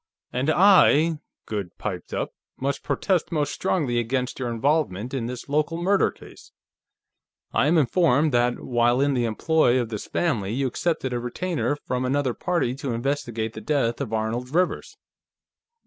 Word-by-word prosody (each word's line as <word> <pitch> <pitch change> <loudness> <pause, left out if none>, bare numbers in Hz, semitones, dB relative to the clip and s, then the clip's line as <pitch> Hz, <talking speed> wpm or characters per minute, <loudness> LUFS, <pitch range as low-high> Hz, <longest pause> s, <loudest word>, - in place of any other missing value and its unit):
"And 130 +4 0
I," 165 -3 +5 0.3
Goode 100 -5 -5
piped - - -5
up, - - -3 0.2
"must 140 +1 -2
protest 185 -4 0
most 150 -3 0
strongly 145 -11 0
against 125 +3 -2
your 125 -2 -2
involvement 125 - 0
in 125 -4 -2
this 125 0 -6
local 150 +3 0
murder 195 +3 +3
case. - - -15 1.0
I - - +3
am 165 +3 +4
informed 155 0 +3
that, 120 0 +2
while 120 0 +2
in 140 0 +2
the 120 -2 +1
employ 130 +2 +2
of 120 -3 -2
this 110 -3 -5
family, 110 - -1
you 135 +3 0
accepted 130 -1 -1
a 120 - -1
retainer 145 +5 -2
from 125 0 -1
another 130 0 0
party 170 -8 -1
to 135 -3 -3
investigate 115 -3 -2
the - - -8
death 135 -5 0
of 125 -6 -4
Arnold 110 +3 -2
Rivers." 180 +1 0
130 Hz, 160 wpm, -24 LUFS, 120-155 Hz, 1.0 s, I